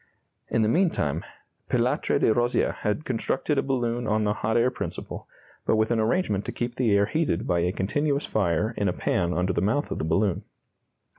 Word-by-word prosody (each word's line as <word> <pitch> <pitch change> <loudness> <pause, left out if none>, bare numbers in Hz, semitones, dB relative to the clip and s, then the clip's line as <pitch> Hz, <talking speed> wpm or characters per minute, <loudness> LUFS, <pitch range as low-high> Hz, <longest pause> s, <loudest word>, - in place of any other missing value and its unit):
In 115 - +2
the - - +2
meantime 110 - +1 0.5
Pilatre - - +1
de 110 - +3
Rozier 120 +2 +1
had 105 +9 -3
constructed 135 +4 0
a - - +3
balloon 120 -3 -1
on 110 0 +1
the 105 0 +1
hot 110 +2 0
air 120 +2 +3
principle, - - -6 0.4
but - - +2
with 110 +1 +1
an 115 - +2
arrangement 110 - +1
to - - -3
keep 120 0 -3
the 120 -3 +1
air 100 - +4
heated 150 - -1
by 85 - +1
a 90 +1 +1
continuous 140 +10 0
fire 100 +2 0
in 100 - +1
a 90 - +1
pan 90 0 0
under 90 +1 0
the - - 0
mouth 115 +10 0
of - - -3
the - - -2
balloon. 90 +4 +1
110 Hz, 200 wpm, -26 LUFS, 95-125 Hz, 0.5 s, air